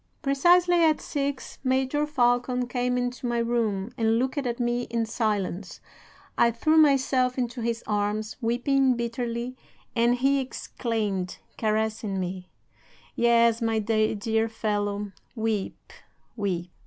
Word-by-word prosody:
"'Precisely 345 +5 +4
at 315 -1 +4
six 280 -2 -4
Major 265 +3 +1
Falcon 250 -2 +1
came 250 0 -1
into 245 0 -2
my 240 0 0
room, 230 -3 0
and 225 0 +3
looked 260 +4 0
at 245 -3 -3
me 240 0 0
in 230 -1 0
silence. 205 -4 -2 0.6
I 235 - +6
threw 235 +8 +1
myself 265 -4 +3
into 245 -1 -2
his 230 0 -2
arms, 210 +1 -1
weeping 255 +3 +2
bitterly, 235 +1 -3 0.4
and 235 +1 +3
he 275 +2 +2
exclaimed, 215 -7 -3 0.2
caressing 215 -2 -1
me: 180 0 -5 0.7
"'"Yes, 235 0 +4
my 225 -1 +1
dear 220 +1 +1
fellow, 205 -2 -2 0.2
weep, 220 -3 -3 0.4
weep."'" 180 -5 -2
235 Hz, 120 wpm, -26 LUFS, 215-255 Hz, 0.7 s, I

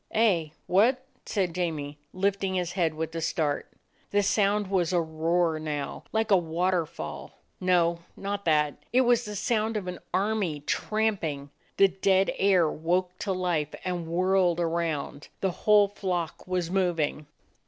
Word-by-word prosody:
"Eh, 200 -8 +2 0.2
what?" 245 +8 +3 0.2
said 185 -5 0
Jamie, 155 -5 -3
lifting 195 0 0
his 180 -2 -1
head 170 -4 0
with 160 +1 -4
a 165 - -3
start. 155 -2 -1 0.4
The 205 0 +2
sound 205 +1 +2
was 185 -3 0
a 180 - +3
roar 165 0 0
now, 150 -2 -4
like 220 -1 0
a 195 - +7
waterfall: 170 0 -2 0.2
no, 175 -2 +2 0.2
not 200 0 -3
that; 150 -3 +1
it 255 - +4
was 240 -1 +3
the 210 0 -6
sound 220 +1 0
of 200 - -4
an 180 - -5
army 190 -5 0
tramping. 165 -8 -1 0.3
The 195 - +6
dead 190 +1 +2
air 190 -4 +4
woke 180 +4 -1
to 200 - -2
life 175 -5 -1
and 175 -2 -2
whirled 180 0 +2
around; 165 -4 -2
the 190 - 0
whole 205 +2 +4
flock 180 -5 -3
was 180 -2 -1
moving. 165 -6 0
180 Hz, 150 wpm, -27 LUFS, 165-200 Hz, 0.4 s, a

